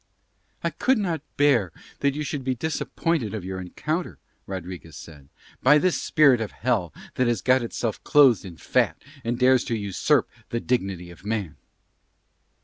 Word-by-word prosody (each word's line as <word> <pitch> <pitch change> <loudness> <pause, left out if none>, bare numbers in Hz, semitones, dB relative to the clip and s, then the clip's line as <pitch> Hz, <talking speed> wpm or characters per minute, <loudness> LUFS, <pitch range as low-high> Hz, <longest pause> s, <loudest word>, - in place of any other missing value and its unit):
"I - - 0
could 265 0 +2
not 175 -7 -1 0.2
bear 130 - +3 0.3
that 140 -1 +1
you 150 - -2
should 145 -1 -4
be 130 0 -1
disappointed 160 - -2
of 100 -4 -5
your 95 0 -4
encounter," 155 - -3 0.3
Rodriguez 90 -4 -7
said, 75 -4 -13 0.3
"by 150 +4 +6
this 180 +3 +1
spirit 140 -6 +4
of 110 - -3
Hell 110 -9 0 0.2
that 125 - +1
has 115 -6 0
got 130 0 +4
itself 115 -2 -3
clothed 135 -9 +5
in 90 -4 -10
fat - - +1 0.2
and 120 +1 -1
dares 125 0 +4
to 115 - -1
usurp 100 -3 +1 0.2
the 115 - -1
dignity 95 -8 -2
of 85 +2 -15
man." 105 -6 -3
120 Hz, 160 wpm, -25 LUFS, 95-140 Hz, 0.3 s, by